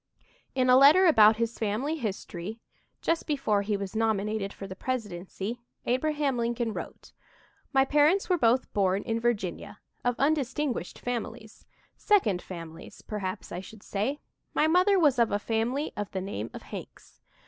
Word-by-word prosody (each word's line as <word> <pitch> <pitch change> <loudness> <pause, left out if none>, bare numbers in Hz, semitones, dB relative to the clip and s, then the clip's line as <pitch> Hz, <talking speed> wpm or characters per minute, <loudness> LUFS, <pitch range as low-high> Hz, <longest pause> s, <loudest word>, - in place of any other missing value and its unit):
'" - - -34
In 255 -1 +2
a 250 0 +7
letter 295 +8 +7
about 220 -10 +7
his 230 +1 -2
family 225 +9 -1
history, 210 - -5 0.4
just 330 0 0
before 270 -9 +1
he 205 0 -1
was 200 +1 -6
nominated 215 -2 0
for 200 - -8
the 190 -1 -7
presidency, 210 -1 -4 0.2
Abraham 280 0 0
Lincoln 235 -1 -1
wrote: - - -8 0.6
"My 270 -1 +4
parents 300 +7 +3
were 360 -2 +2
both 240 +1 +2
born 195 -1 +1
in 225 0 -1
Virginia, 220 -7 -2 0.3
of 245 0 +1
undistinguished 285 -2 0
families 230 -2 -6 0.3
second 220 - +2
families, 165 -3 -10
perhaps 200 -2 -5
I 175 - -4
should 200 +3 -12
say. 230 +9 -2 0.4
My - - +4
mother 365 +5 +4
was 290 -8 +4
of 235 - +3
a 205 - +2
family 230 +7 -1
of 205 -2 -4
the 190 - -4
name 115 - -4
of - - -9
Hanks. - - -10
230 Hz, 160 wpm, -28 LUFS, 200-275 Hz, 0.6 s, a